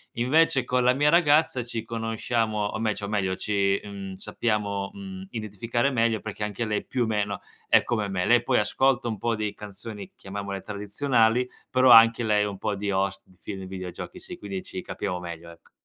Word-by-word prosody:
Invece 130 +2 +3
con 125 0 +1
la 125 +1 +5
mia 145 +3 +3
ragazza 150 -5 +4
ci 115 -1 -4
conosciamo, 115 -1 -1
o 105 - -4
me 110 -1 +1
cio 100 - -5
meglio 100 -3 0
ci, 100 -1 +1
mhmm, 100 -2 -7
sappiamo, 100 -1 -2
mhmm, 95 -1 -8
identificare 115 +3 -1
meglio 115 -4 +1
perché 105 -1 -6
anche 105 +2 -3
lei 105 -1 -2
più 125 -3 -1
meno 105 -2 -1 0.3
è - - +6
come 110 -4 -1
me. 95 -2 -1
Lei 120 -1 +5
poi - - +2
ascolta 125 +4 +2
un 110 -2 -2
po' 120 +3 0
di 105 -1 -2
canzoni, 105 0 -8
chiamiamole 100 0 -6
tradizionali, 115 +4 +1 0.2
però 130 0 +5
anche 115 0 +8
lei 105 -2 +2
un 100 -2 -5
po' 105 0 -1
di 100 0 -2
host 95 0 -1
di 95 - -23
film, 95 -2 -6
videogiochi 95 -1 -7
sì, - - -8
quindi 100 -2 -5
ci 95 - -6
capiamo 90 -3 -4
meglio, 85 -1 -8
ecco. 85 0 -17
105 Hz, 190 wpm, -26 LUFS, 100-120 Hz, 0.3 s, anche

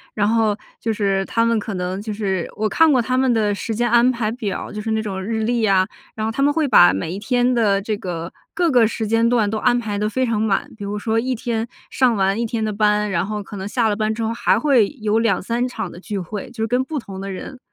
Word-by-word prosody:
然 205 -1 +2
后 220 -2 +2 0.2
就 225 - -1
是 195 -2 0
他 230 +3 +1
们 230 -1 +2
可 205 0 -5
能 185 +2 -3
就 215 - -5
是 195 -4 -2
我 215 0 0
看 325 +6 +4
过 260 - +4
他 255 +2 0
们 260 -1 +3
的 215 -3 +2
时 220 +2 -4
间 240 +2 +1
安 240 +2 +5
排 230 -3 -2
表 215 -5 -4
儿， - - -10
就 210 - -4
是 220 - -4
那 220 0 +1
种 190 -2 -4
日 220 +1 -2
历 235 +1 0
呀， 195 -3 +3 0.3
然 215 - -2
后 225 - -1
他 275 - -3
们 285 +1 +4
会 305 -1 +1
把 90 - +7
每 95 +12 -3
一 190 - -4
天 245 +3 +1
的 205 -4 +2
这 215 +1 -2
个 170 -4 -5 0.2
各 340 -1 +2
个 240 -4 +5
时 225 0 -3
间 225 +2 +2
段 235 -4 +2
都 215 +1 -2
安 245 -1 +3
排 210 -4 -3
得 210 +1 0
非 260 +3 0
常 225 -3 0
满， 210 -3 0
比 210 - -9
如 200 +1 -3
说 220 +2 0
一 255 +2 -1
天 230 0 -2 0.2
上 250 -3 +3
完 195 +2 +1
一 - - +1
天 225 -1 -2
的 215 - -2
班， 210 0 +1
然 170 -3 +1
后 210 0 -4
可 205 - -10
能 190 +1 -5
下 230 +1 +1
了 205 - +1
班 215 0 -1
之 225 - -3
后 225 - -1
还 235 - +2
会 260 -9 +3
有 215 0 +1
2-3 230 +2 0
场 250 - -5
的 175 - -11
聚 200 +2 -5
会， 195 +2 -5
就 225 -2 -5
是 - - 0
跟 250 +3 +1
不 305 +3 -5
同 195 -7 -7
的 195 - -5
人。 250 +7 -7
220 Hz, 295 characters per minute, -21 LUFS, 205-235 Hz, 0.3 s, 把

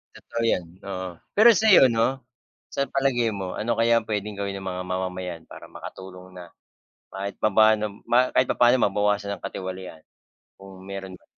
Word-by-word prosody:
Totoo 115 - -6
yan, 90 -6 +1 0.2
oo. 95 -1 -4 0.3
Pero 220 +3 +8
sayo, 210 - +6
no, 120 +3 0 0.5
sa 140 - -1
palagay 125 -4 +1
mo 95 -2 -5
ano 115 +2 0
kaya 115 0 +4
ang 110 - -14
pwedeng 105 -1 -3
gawin 100 -1 -3
ng 95 - -8
mga 90 0 -3
mamamayan 90 -2 -4
para - - -12
makatulong 95 0 -11
na 90 -1 -11 0.6
kahit 100 +1 -5
papaano 110 0 +3
ma 125 +1 +3
kahit 130 - +3
papaano 120 +1 +4
mabawasan 105 0 0
ang 95 - -9
katiwalian? 95 -3 -7 0.6
Kung 95 -1 -13
meron 95 -1 -7
man. - - -22
100 Hz, 165 wpm, -24 LUFS, 95-115 Hz, 0.6 s, Pero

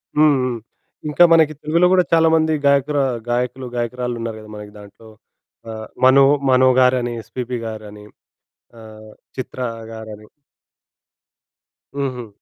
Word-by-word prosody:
హ్మ్. 150 -1 +5
హ్మ్. 125 -2 -2 0.5
ఇంకా 150 +4 +4
మనకి 160 -2 +4
తెలుగులో 165 +4 +2
గూడా 185 -1 +4
చాలా 165 0 +5
మంది 160 0 +2
గాయకురా 140 0 +2 0.3
గాయకులు, 125 +2 -2
గాయకురాళ్ళున్నారు 120 -1 -4
గదా! 110 - -13
మనకి 105 0 -10
దాంట్లో, 105 +2 -15 0.6
ఆహ్, 110 0 -7 0.2
'మనో, 135 +1 +6 0.3
మనో' 130 0 +5
గారని, 125 -1 +2
'ఎస్‌పీబీ' 125 +2 -5
గారని, 105 -1 -9 0.8
ఆహ్, 110 -1 -13 0.3
'చిత్ర' 130 -1 -4 0.2
గారని. 110 -1 -10 1.7
హుహు. 130 -4 -4
125 Hz, 115 wpm, -19 LUFS, 110-140 Hz, 1.7 s, మనో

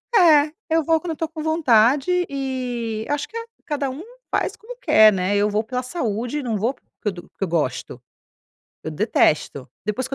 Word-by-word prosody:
É, 310 -6 +6 0.2
eu 325 0 +2
vou 325 +1 +3
quando 345 - -4
eu - - -1
estou 325 +1 -3
com 315 0 -7
vontade 285 -2 +3 0.2
e 250 -5 -3
acho 290 0 -1
que 455 - -17 0.3
cada 285 -3 -2
um 280 +7 -7 0.3
faz - - -1
como 475 +3 -11
quer, 220 - +6
né? 190 +1 0
Eu 205 +1 +2
vou 210 +1 0
pela 250 +3 -3
saúde 245 - -3
e - - -5
não 235 -3 -1
vou 225 +6 0
porque - - -35 0.2
eu 210 - +1
to 175 -1 -10
porque - - -6
eu - - 0
gosto. 165 -2 -2 0.8
Eu - - -3
detesto. 155 - +1 0.2
Depois 245 +5 -2
que 270 - -7
255 Hz, 200 wpm, -22 LUFS, 215-305 Hz, 0.8 s, É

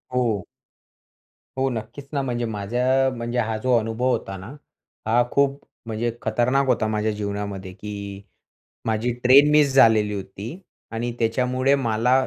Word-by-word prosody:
हो. 115 -7 0 1.1
हो, 135 0 +1
नक्कीच 115 +4 -6
ना. 140 - +1
म्हणजे 120 -2 -2
माझ्या 125 +5 +1
म्हणजे 120 +1 -2
हा 110 -1 -1
जो 125 +3 +2
अनुभव 115 +2 -1
होता 95 -6 -2
ना, 95 - -9 0.6
हा 120 +2 +4
खूप 140 0 +2 0.3
म्हणजे 115 +2 -1
खतरनाक 125 +5 +1
होता 110 -3 +2
माझ्या 110 0 0
जीवनामध्ये 100 -2 -4
की 105 +3 -8 0.9
माझी 110 +2 0
ट्रेन 140 +4 +7
मिस 150 -2 +4
झालेली 110 -5 +5
होती 100 +2 -6 0.4
आणि 115 +1 -2
त्याच्यामुळे 125 +4 +1
मला 115 -1 +1
115 Hz, 135 wpm, -23 LUFS, 110-130 Hz, 1.1 s, ट्रेन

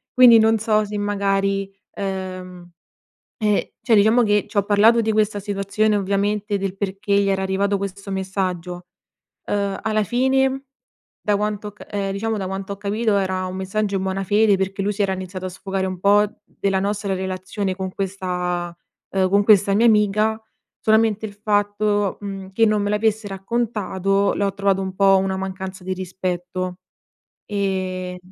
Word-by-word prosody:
Quindi 245 -2 +8
non 220 0 +4
so 215 0 +2
se 210 0 -5
magari, 195 -1 0 0.2
ehm, 185 -2 -5 0.7
eh, 210 -2 0
cioè 235 - +3
diciamo 220 +4 +5
che, 210 -1 +2
ci 215 - -12
ho 200 - +3
parlato 215 +3 +5
di 220 -1 0
questa 210 -1 +1
situazione 205 +1 0
ovviamente, 200 +1 0
del 195 -1 -3
perché 200 +1 -2
gli 200 - +1
era 195 -1 +1
arrivato 200 +1 0
questo 200 0 -6
messaggio. 185 -2 -3 0.6
Uhm, 200 -1 -1
alla 215 -1 +1
fine, 265 +3 +1 0.6
da 210 - +1
quanto 210 0 -2
ho - - -6
ca - - -13
uhm, 200 -1 -2
diciamo, 220 +2 -2
da 190 - -3
quanto 195 +1 -5
ho - - -10
capito 210 +2 0
era 185 -1 -1
un 185 0 -5
messaggio 200 +1 -1
in - - -3
buona 190 0 -2
fede, 205 +1 +3
perché 195 +1 -2
lui 205 - +1
si 205 - 0
era 195 -1 0
iniziato 185 0 -6
a 185 - -2
sfogare 190 +1 -3
un 185 -1 -5
po' 205 +2 +5 0.2
della 195 -1 -1
nostra 200 0 -1
relazione 190 +1 -3
con 190 -1 -5
questa, 180 -3 -3 0.4
uhm, 190 -1 +2
con 200 +1 +3
questa 200 -2 +5
mia 225 +3 +4
amica. 215 +1 +2 0.4
Solamente 220 -1 +3
il 210 - -6
fatto, 205 -1 0
mhmm, 195 -1 -6
che 225 +3 +4
non 215 -1 +2
me 205 - -1
l'avesse 210 0 0
raccontato, 195 -1 0
l'ho 200 -1 0
trovato 195 -1 +1
un 190 -1 -4
po' 195 0 +5
una 190 0 0
mancanza 190 0 -5
di 185 - -1
rispetto. 185 0 -4 0.7
Ehm, 185 -2 -2
200 Hz, 170 wpm, -21 LUFS, 190-210 Hz, 0.7 s, Quindi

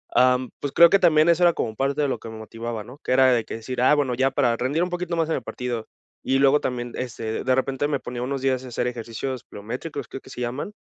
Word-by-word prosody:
am, 125 0 +4
pues, 145 - -3
creo 170 0 +7
que 200 - +4
también 155 -2 +5
eso 170 +1 +4
era 170 -1 +6
como 110 -1 -3
parte 140 +4 0
de 145 - +2
lo - - -2
que 115 - -9
me 110 - -8
motivaba, 115 0 -6
¿no?, 130 +4 -13
que - - -3
era 130 0 +5
de 115 -2 +1
que - - -7
decir, 125 +3 -4
ah, 140 +4 +5
bueno, 135 -4 0
ya 135 +1 +2
para 125 -4 +2
rendir 135 +8 -1
un 180 - -2
poquito 175 -1 -3
más 165 -1 +1
en - - +1
el - - -4
partido, 120 -3 -4 0.3
y 135 - +1
luego 140 +2 +5
también, 120 -1 -3
este, 115 -3 -4
de 130 -1 +3
repente 135 +2 0
me 145 -3 -1
ponía 120 0 -6
unos 135 +1 -2
días 130 -1 0
a - - -8
hacer 120 +1 -1
ejercicios 120 +2 -5
biométricos, 125 +9 -6
creo 135 - -7
que - - -16
se 125 - -7
llaman, 130 +12 -4
130 Hz, 270 wpm, -24 LUFS, 120-145 Hz, 0.3 s, creo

